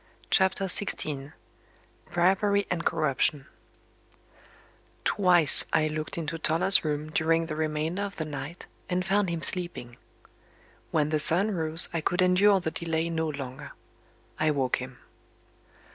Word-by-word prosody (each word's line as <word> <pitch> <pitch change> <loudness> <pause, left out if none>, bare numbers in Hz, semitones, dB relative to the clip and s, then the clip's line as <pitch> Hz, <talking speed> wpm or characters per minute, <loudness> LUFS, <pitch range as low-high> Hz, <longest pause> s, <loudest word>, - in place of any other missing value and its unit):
CHAPTER 190 0 +2
XVI 150 -7 -3 0.8
BRIBERY 195 +4 +1
AND 170 -2 -2
CORRUPTION 150 -3 0 1.6
Twice, 175 -7 +3
I 155 -1 +2
looked 155 +1 -5
into 165 0 -4
Toller's 180 +5 +4
room 150 0 -3
during 165 +1 +1
the 160 -2 -5
remainder 155 +4 -2
of 200 -1 -5
the 155 - -4
night, 150 +3 -8 0.2
and 180 0 -1
found 195 0 +1
him 165 -2 -4
sleeping. 155 -10 -3 0.9
When 150 -2 0
the 155 -1 0
sun 180 +8 +1
rose, 160 -2 +7
I 165 - -1
could 180 +4 0
endure 190 +2 +4
the 160 -3 -4
delay 165 0 -3
no 160 -1 -2
longer. 140 -1 -8 0.7
I 155 - +2
woke 135 -4 0
him. 125 0 -9
160 Hz, 130 wpm, -27 LUFS, 150-180 Hz, 1.6 s, rose